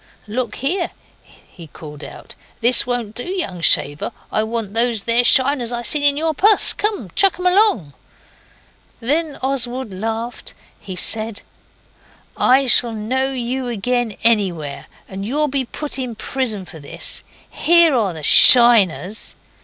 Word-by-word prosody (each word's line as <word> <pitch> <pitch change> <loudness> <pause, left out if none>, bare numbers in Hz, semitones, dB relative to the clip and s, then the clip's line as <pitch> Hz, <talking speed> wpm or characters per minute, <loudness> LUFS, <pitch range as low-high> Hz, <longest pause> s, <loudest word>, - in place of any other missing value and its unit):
'Look 230 +1 -4
here,' 340 +7 -3 0.3
he 170 -3 -17
called 150 0 -12
out, - - -12 0.3
'this 240 +1 +3
won't 240 -4 -4
do, 245 - -5
young 345 - -5
shaver. 145 -2 +1 0.2
I - - 0
want 220 -2 -4
those 230 -2 +2
there 235 +1 +2
shiners 260 -1 +3
I 240 0 -5
see 290 +4 +1
in 285 0 +1
your 320 +1 -2
pus! 415 +7 +3 0.4
Chuck 390 -3 +3
'em 365 - -7
along!' 360 - +1 1.1
Then 295 +5 -2
Oswald 260 -4 -3
laughed. 225 +4 -6 0.2
He 190 -2 -9
said 220 +3 -1 0.9
'I 265 +2 +2
shall 240 -2 +4
know 255 +5 -3
you 255 0 -4
again 240 0 -3
anywhere, 185 -11 -1 0.2
and 195 0 -8
you'll 295 +8 -2
be 270 -2 -3
put 290 +3 -6
in 250 -3 -6
prison 220 -4 -4
for 160 - -13
this. 140 - -6 0.3
Here 340 -2 +3
are 215 -8 -1
the 155 -2 -10
SHINERS. 220 - +5
240 Hz, 140 wpm, -18 LUFS, 210-270 Hz, 1.1 s, SHINERS